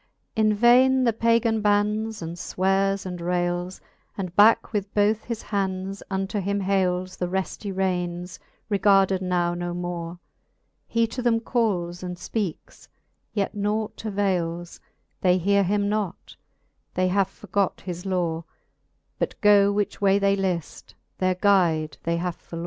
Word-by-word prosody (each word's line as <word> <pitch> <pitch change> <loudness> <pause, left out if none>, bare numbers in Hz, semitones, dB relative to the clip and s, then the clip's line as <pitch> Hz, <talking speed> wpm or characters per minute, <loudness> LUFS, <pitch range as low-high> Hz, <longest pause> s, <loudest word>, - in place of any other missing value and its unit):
In 215 -2 +3
vaine 255 +4 +5
the 235 -2 +3
Pagan 230 0 +2
bannes, 210 0 +1
and 165 +1 -5
fweares, 195 +2 0
and 180 -1 -5
rayles, 175 +1 -1 0.4
And 185 -3 -5
backe 215 +3 +5
with 200 -1 -2
both 210 +1 +2
his 235 -2 -5
hands 195 -1 -3
unto 195 +1 -2
him 200 +1 -1
hayles 185 -1 0
The 180 - -1
refty 190 +2 -3
raynes, 180 -2 -2 0.3
regarded 195 -2 +3
now 175 -2 0
no 175 0 -4
more: 175 -1 -4 0.7
He 230 0 +2
to 230 +3 -5
them 235 -2 +2
calles 195 -8 -1
and 180 -1 -5
fpeakes, 185 -2 -5 0.5
yet 200 -1 0
naught 210 +1 -2
avayles; 180 -5 -2 0.4
They 180 -1 +4
heare 200 +2 +3
him 200 +2 +1
not, 205 -4 -3 0.6
they 185 0 +2
have 195 0 +2
forgot 200 -1 -2
his 180 -1 -6
lore^ 175 -4 -1 0.8
But - - -2
go, 205 -1 +5
which 205 0 -2
way 195 0 +4
they 200 0 +2
lift, 185 -4 -3 0.2
their 185 0 +2
guide 175 -6 +2
they 170 0 -1
have 175 0 -2
forlore. 165 - -9
195 Hz, 145 wpm, -25 LUFS, 180-210 Hz, 0.8 s, vaine